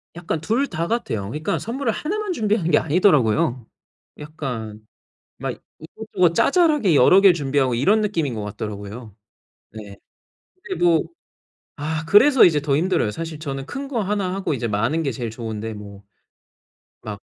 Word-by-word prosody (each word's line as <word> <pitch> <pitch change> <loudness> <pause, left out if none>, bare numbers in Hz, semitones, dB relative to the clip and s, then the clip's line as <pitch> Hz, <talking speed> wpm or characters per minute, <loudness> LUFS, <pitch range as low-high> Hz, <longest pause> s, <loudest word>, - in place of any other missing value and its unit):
약간 170 -2 -3
2 240 +10 0
다 170 -1 -3
같아요. 225 - -2
그러니까 155 - -2
선물을 235 +1 -2
1 360 - -3
만 420 -3 -3
준비하는 210 - 0
게 - - +5
아니더라고요. 150 - +2 0.5
약간 120 -8 -6 0.5
막 - - -4 0.3
이것저것 180 0 -1
자잘하게 300 - +3
여러 185 +9 +6
개를 195 -3 +7
준비하고 135 -4 0
이런 200 - +3
느낌인 165 - -1
것 105 -2 -5
같더라고요. 105 +1 -7 0.6
네. 105 -2 -10 0.7
근데 375 - -5
뭐 165 -2 +4 0.8
아 155 +2 -3
그래서 250 - +7
이제 150 -4 +2
더 145 -2 0
힘들어요. 165 - +1
사실 160 +4 -6
저는 135 -3 -5
큰 280 0 -6
거 265 -4 -2
1 195 -2 -1
하고 195 -6 -2
이제 120 -2 -3
마는 115 +10 0
게 135 -4 -1
제일 120 0 -4
좋은데 110 -1 -6
뭐. 100 -1 -11 1.0
막 - - -6
155 Hz, 310 characters per minute, -22 LUFS, -, 1.0 s, 개를